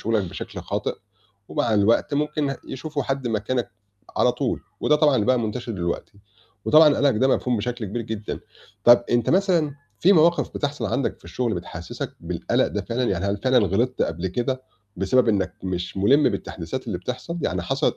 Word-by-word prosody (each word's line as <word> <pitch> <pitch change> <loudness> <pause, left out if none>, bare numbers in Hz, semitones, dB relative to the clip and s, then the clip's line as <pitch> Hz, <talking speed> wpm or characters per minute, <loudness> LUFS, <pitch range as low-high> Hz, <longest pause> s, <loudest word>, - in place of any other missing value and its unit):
شُغلك 110 -3 +1
بشكل 85 - -7
خاطئ - - -2 0.5
ومع 110 - 0
الوقت 115 +8 +3
ممكن 150 -1 0
يشوفوا 145 +1 -3
حد 135 -1 -2
مكانك 115 +3 -1 0.5
على - - +4
طول - - -2 0.2
وده 150 - +4
طبعًا 150 -2 +4
اللي 105 - +1
بقى 130 0 +4
منتشر 115 +1 -3
دلوقتي. 85 -3 -3 0.5
وطبعًا 155 -1 +6
قَلَقك 140 -4 +3
ده 130 +4 +3
مفهوم 125 -2 +1
بشكل 120 +2 -3
كبير 115 +4 -3
جدًا. 110 -1 -5 0.4
طَب 120 0 +7
أنت 120 -1 +2
مثلًا 175 -6 +2 0.3
في 190 - +6
مواقِف 170 0 +4
بتحصل 145 0 -2
عندك 140 - -1
في - - -25
الشُغل 120 -4 -2
بتحسِّسك 85 -1 -6
بالقَلَق - - 0
ده - - -3
فعلًا؟ 120 +2 -2
يعني 95 -5 -1
هل 100 +1 0
فعلًا 130 -1 +5
غلطت 120 +7 0
قبل 85 +3 -2
كده 125 +7 -2 0.3
بسبب 115 +7 +3
إنّك 95 -4 +1
مش 90 -1 -4
مُلِم 135 +10 +4
بالتحديثات 100 +2 -5
اللي 95 -6 -3
بتحصل، 125 - -5
يعني 90 -1 -1
حصلت - - 0
120 Hz, 175 wpm, -24 LUFS, 100-140 Hz, 0.5 s, طَب